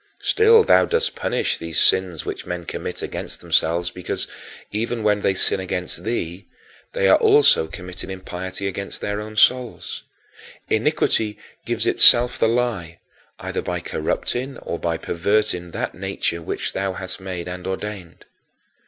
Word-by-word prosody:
Still 450 Hz, +1 st, +5 dB
thou -, -, +5 dB
dost 470 Hz, +2 st, +1 dB
punish -, -, -1 dB
these 80 Hz, -2 st, -1 dB
sins 90 Hz, -4 st, +3 dB
which -, -, -6 dB
men 90 Hz, -1 st, -5 dB
commit -, -, -5 dB
against -, -, -4 dB
themselves 85 Hz, +2 st, +1 dB
because, 90 Hz, -1 st, -3 dB, 0.4 s
even 115 Hz, +2 st, -2 dB
when 105 Hz, -1 st, +2 dB
they 95 Hz, -, +1 dB
sin 95 Hz, -, +3 dB
against 90 Hz, -1 st, -3 dB
thee, 100 Hz, -5 st, -4 dB, 0.5 s
they -, -, +1 dB
are -, -, +6 dB
also 430 Hz, -, +5 dB
committing 90 Hz, +3 st, -7 dB
impiety 95 Hz, +1 st, -5 dB
against 100 Hz, +1 st, -5 dB
their 105 Hz, 0 st, -3 dB
own 110 Hz, 0 st, -9 dB
souls. 125 Hz, +1 st, +2 dB, 0.7 s
Iniquity 105 Hz, -2 st, +1 dB, 0.3 s
gives -, -, 0 dB
itself 120 Hz, +1 st, +6 dB
the 115 Hz, -, +3 dB
lie, 110 Hz, -9 st, -2 dB, 0.4 s
either -, -, -4 dB
by -, -, -3 dB
corrupting 130 Hz, +3 st, -3 dB
or 85 Hz, -, -4 dB
by 85 Hz, -1 st, -1 dB
perverting 90 Hz, +1 st, 0 dB
that -, -, -4 dB
nature 85 Hz, 0 st, -3 dB
which 80 Hz, -, -4 dB
thou 95 Hz, -1 st, -2 dB
hast 95 Hz, 0 st, -5 dB
made 90 Hz, -2 st, -6 dB
and 90 Hz, 0 st, -6 dB
ordained. 95 Hz, -2 st, -6 dB
95 Hz, 145 wpm, -21 LUFS, 90-115 Hz, 0.7 s, are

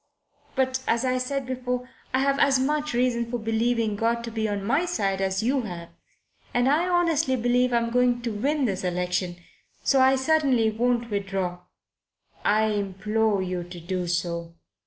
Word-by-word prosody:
But, 260 Hz, -1 st, +1 dB
as 235 Hz, +2 st, +1 dB
I 255 Hz, 0 st, +1 dB
said 275 Hz, +1 st, -2 dB
before, 250 Hz, -1 st, -3 dB, 0.2 s
I've 275 Hz, +1 st, +2 dB
as 270 Hz, -1 st, +4 dB
much 295 Hz, 0 st, 0 dB
reason 240 Hz, -1 st, +1 dB
for 245 Hz, -, -2 dB
believing 225 Hz, -1 st, 0 dB
God 230 Hz, +2 st, 0 dB
to 230 Hz, -, -5 dB
be 220 Hz, -1 st, -1 dB
on 200 Hz, -1 st, -3 dB
my 280 Hz, -, +2 dB
side 200 Hz, -, -1 dB
as 190 Hz, +2 st, 0 dB
you 260 Hz, +3 st, +2 dB
have. 175 Hz, -6 st, -7 dB, 0.7 s
And 245 Hz, +1 st, +3 dB
I 320 Hz, +6 st, +2 dB
honestly 330 Hz, -6 st, +2 dB
believe 245 Hz, +1 st, +2 dB
I'm 235 Hz, -1 st, +1 dB
going 245 Hz, 0 st, +2 dB
to 235 Hz, -, -1 dB
win 275 Hz, +7 st, 0 dB
this 195 Hz, -4 st, -2 dB
election. 180 Hz, 0 st, -1 dB, 0.5 s
So 270 Hz, -1 st, +4 dB
I 265 Hz, +1 st, +5 dB
certainly 265 Hz, -5 st, +2 dB
won't 235 Hz, +1 st, 0 dB
withdraw." 195 Hz, -3 st, -2 dB, 0.8 s
"I 215 Hz, +1 st, +3 dB
implore 205 Hz, +1 st, 0 dB
you 180 Hz, -1 st, -3 dB
to 175 Hz, 0 st, -10 dB
do 180 Hz, +1 st, -3 dB
so. 170 Hz, -1 st, -2 dB
235 Hz, 165 wpm, -25 LUFS, 195-260 Hz, 0.8 s, I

